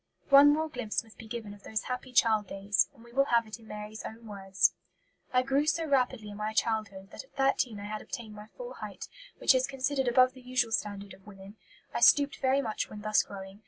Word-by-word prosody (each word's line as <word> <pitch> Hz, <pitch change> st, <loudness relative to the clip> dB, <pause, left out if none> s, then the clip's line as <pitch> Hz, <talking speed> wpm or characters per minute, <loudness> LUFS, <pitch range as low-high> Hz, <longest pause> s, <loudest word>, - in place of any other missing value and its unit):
One 280 Hz, +1 st, +8 dB
more 315 Hz, +2 st, +1 dB
glimpse 250 Hz, -8 st, -3 dB
must 225 Hz, -1 st, -20 dB
be 225 Hz, -, -10 dB
given 220 Hz, -2 st, -6 dB
of 205 Hz, -, -15 dB
those 215 Hz, +1 st, -3 dB
happy 250 Hz, +1 st, -5 dB
child 220 Hz, -4 st, +3 dB
days, 195 Hz, -2 st, +1 dB
and 230 Hz, -, -17 dB
we 235 Hz, 0 st, -16 dB
will 275 Hz, +2 st, +3 dB
have 235 Hz, -3 st, +2 dB
it 215 Hz, +2 st, -9 dB
in 225 Hz, -, -17 dB
Mary's 210 Hz, +1 st, -7 dB
own 230 Hz, +1 st, -9 dB
words: 195 Hz, -4 st, +1 dB, 0.6 s
"I 250 Hz, 0 st, +3 dB
grew 275 Hz, +3 st, +1 dB
so 330 Hz, +1 st, +1 dB
rapidly 255 Hz, -6 st, 0 dB
in 205 Hz, -, -9 dB
my 215 Hz, +1 st, -3 dB
childhood, 215 Hz, -4 st, -1 dB
that -, -, -8 dB
at -, -, -27 dB
thirteen 270 Hz, -5 st, +1 dB
I 200 Hz, -, -7 dB
had 215 Hz, +1 st, -5 dB
obtained 225 Hz, -3 st, -7 dB
my 210 Hz, 0 st, -11 dB
full -, -, -9 dB
height, -, -, -8 dB, 0.3 s
which -, -, +5 dB
is 255 Hz, 0 st, +2 dB
considered 270 Hz, 0 st, -1 dB
above 255 Hz, +1 st, +5 dB
the 260 Hz, -, -14 dB
usual 250 Hz, -2 st, 0 dB
standard 200 Hz, -2 st, -3 dB
of 190 Hz, +2 st, -18 dB
women. 195 Hz, 0 st, -12 dB, 0.4 s
I -, -, -1 dB
stooped 285 Hz, -1 st, +5 dB
very 270 Hz, +1 st, +2 dB
much 220 Hz, -3 st, -3 dB
when 210 Hz, -, -9 dB
thus 215 Hz, 0 st, +3 dB
growing. 195 Hz, 0 st, -10 dB
225 Hz, 230 wpm, -30 LUFS, 210-260 Hz, 0.6 s, One